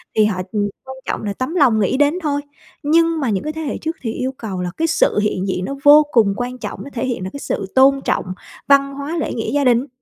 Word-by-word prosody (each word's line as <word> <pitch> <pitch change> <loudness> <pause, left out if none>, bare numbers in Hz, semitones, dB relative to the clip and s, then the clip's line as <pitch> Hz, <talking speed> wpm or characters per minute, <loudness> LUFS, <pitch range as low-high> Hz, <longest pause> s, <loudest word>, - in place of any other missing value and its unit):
thì 215 - +5
họ, 195 -3 -1
ừm, 205 -2 0 0.2
quan 265 - -8
trọng - - -3
là 205 -1 -2
tấm 255 - -4
lòng 260 -10 +4
nghĩ 210 +5 +1
đến 290 +1 +3
thôi. 285 -2 0 0.4
Nhưng 330 +2 +3
mà 270 -5 -1
những 200 -3 -1
cái 305 +1 -3
thế 320 - -5
hệ 295 - -3
trước 320 +1 -4
thì 225 - -3
yêu 260 +1 -2
cầu 195 -5 -5
là 180 -1 -3
cái 325 +1 +1
sự 325 -9 +2
hiện 205 -2 -1
diện 185 -1 -2
nó 275 - -4
vô 295 +1 +8
cùng 215 -6 +4
quan 250 +1 -4
trọng, - - -6
nó 280 - -9
thể 245 +1 -2
hiện 245 -7 -3
được 185 - -4
cái 280 - -6
sự 195 - -3
tôn 270 +1 +5
trọng - - -1 0.4
văn 275 0 +4
hóa, 285 +4 -4
lễ - - -2
nghĩa 225 - -3
gia 285 0 +1
đình. 250 +1 +3
265 Hz, 270 wpm, -19 LUFS, 215-290 Hz, 0.4 s, vô